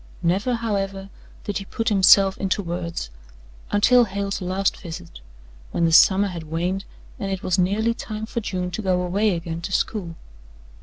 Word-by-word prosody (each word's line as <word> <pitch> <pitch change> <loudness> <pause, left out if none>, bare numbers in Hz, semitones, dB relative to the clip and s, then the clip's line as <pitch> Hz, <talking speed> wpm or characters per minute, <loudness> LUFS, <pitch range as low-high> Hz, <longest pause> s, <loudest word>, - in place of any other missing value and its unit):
Never, 195 +9 +1
however, 195 -4 -3 0.3
did 205 -2 -3
he 195 - -8
put 225 +4 -2
himself 195 -1 +6
into 195 +1 -1
words 170 - -4 0.6
until 240 +4 +5
Hale's 200 -1 -3
last 190 +2 0
visit, 85 - -9 0.5
when 170 - 0
the 165 - +2
summer 195 +4 +6
had 175 -3 -6
waned 180 +4 -2 0.3
and 195 -1 -3
it 190 -1 -4
was 185 +1 +1
nearly 210 +6 +2
time 215 -1 -6
for 235 - -3
June 180 -3 -3
to 220 - -4
go 185 -3 +1
away 195 +2 +1
again 165 0 -5
to 170 - -5
school. 185 -4 -1
195 Hz, 165 wpm, -23 LUFS, 180-205 Hz, 0.6 s, himself